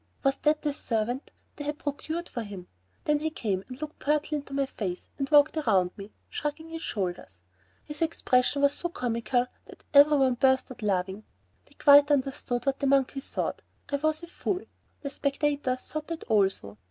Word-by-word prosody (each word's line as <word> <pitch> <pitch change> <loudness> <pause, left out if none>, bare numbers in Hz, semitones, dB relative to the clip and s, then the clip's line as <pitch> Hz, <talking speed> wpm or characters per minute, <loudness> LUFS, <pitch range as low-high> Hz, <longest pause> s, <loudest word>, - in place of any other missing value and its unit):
Was 275 -1 +2
that 300 0 +1
the 295 -2 0
servant 240 0 -2 0.3
they 290 - -5
had 295 +1 -3
procured 315 +4 -4
for 240 - -4
him. 200 -4 -8 0.4
Then 300 -1 +2
he 315 +1 -1
came 200 -10 -2
and 255 0 -9
looked 305 0 -6
pertly 300 +1 +1
up - - -7
into 275 - -12
my 275 0 +2
face, 185 -8 -5
and 275 0 -1
walked 295 +1 +6
around 185 -12 +2
me, 200 +1 -9 0.2
shrugging 300 +2 -4
his 325 0 -6
shoulders. 175 - -4 0.4
His 295 0 -9
expression 280 -4 +2
was 280 0 +5
so 345 - -3
comical 245 -3 0 0.2
that - - -15
every 290 +1 +8
one 265 -2 +4
burst 260 +1 +2
out 255 - -10
laughing. 195 0 -1 0.4
They - - -20
quite 285 0 +7
understood 265 -3 0
that 275 0 0
the 280 - +1
monkey 275 0 +2
thought 270 - -3 0.3
I 285 - +2
was 310 +3 0
a - - -7
fool. 365 +2 -2 0.4
The 280 - -4
spectators 280 -2 0
thought 310 0 -6
that 330 -1 -5
also. 195 - +1
275 Hz, 190 wpm, -28 LUFS, 230-300 Hz, 0.4 s, every